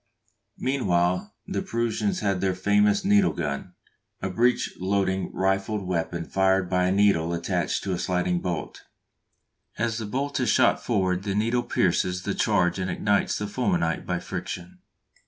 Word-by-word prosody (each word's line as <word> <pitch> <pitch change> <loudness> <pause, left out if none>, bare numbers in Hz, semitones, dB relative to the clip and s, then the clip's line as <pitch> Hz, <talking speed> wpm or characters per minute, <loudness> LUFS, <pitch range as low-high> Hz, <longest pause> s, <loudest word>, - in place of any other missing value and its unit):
Meanwhile 90 -9 0
the - - -2
Prussians 120 - -1
had 95 -2 0
their 95 -1 +1
famous 105 - +2
needle 205 -1 +4
gun, 75 +3 -4 0.4
a 95 - -3
breech 120 +6 +1
loading 95 0 0
rifled 95 +2 0
weapon 85 -1 -2
fired 95 -1 +1
by 90 0 +2
a - - +1
needle 95 -4 +3
attached 85 -1 -1
to 95 - -2
a 90 - -2
sliding 90 0 0
bolt; 85 -2 -4 1.0
as 115 -1 -1
the 110 - -4
bolt 140 +5 -2
is 125 - +1
shot 125 -2 +3
forward 95 -5 +1
the 100 -1 -3
needle 115 +4 +1
pierces 90 -4 0
the 100 - -1
charge 95 -4 +1
and 95 0 -2
ignites 100 +3 +1
the 105 - -3
fulminate 100 -7 -1
by - - 0
friction. 90 +1 -6
95 Hz, 155 wpm, -25 LUFS, 90-110 Hz, 1.0 s, needle